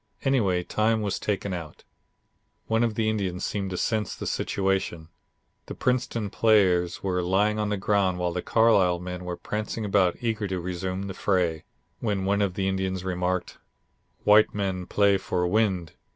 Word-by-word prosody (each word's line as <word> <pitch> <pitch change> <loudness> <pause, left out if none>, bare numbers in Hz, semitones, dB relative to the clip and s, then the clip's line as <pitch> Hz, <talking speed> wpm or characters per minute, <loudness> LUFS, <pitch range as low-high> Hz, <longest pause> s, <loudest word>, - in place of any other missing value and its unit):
Anyway, 100 -10 +2
time 110 +3 +1
was 100 - -2
taken 100 -2 -2
out. 80 -4 -7 0.8
One 115 +1 +1
of 115 -2 0
the 110 -1 0
Indians 100 -4 -1
seemed 100 -2 -2
to 90 - -4
sense 110 +1 -1
the - - -7
situation. 95 -4 -1 0.6
The - - -6
Princeton 120 -5 -1
players 90 -6 +3
were 90 -2 0
lying 100 +4 +1
on 105 -1 0
the 105 - 0
ground 100 -2 +1
while 90 -1 -1
the 90 - -2
Carlisle 100 -6 +3
men 90 0 -6
were 90 -1 -4
prancing 105 +1 -4
about 95 -3 +2
eager 110 -3 -1
to 95 -1 -2
resume 90 +2 -3
the 100 -1 -5
fray, 90 -5 0 0.3
when 100 -4 -1
one 100 +1 +1
of 95 -3 0
the 95 -1 -1
Indians 95 -1 -1
remarked: 90 0 -2 0.6
"White 105 +1 +5
man 95 -3 -2
play 100 -1 +3
for 90 -1 -1
wind. 95 -3 +1
95 Hz, 165 wpm, -26 LUFS, 90-105 Hz, 0.8 s, White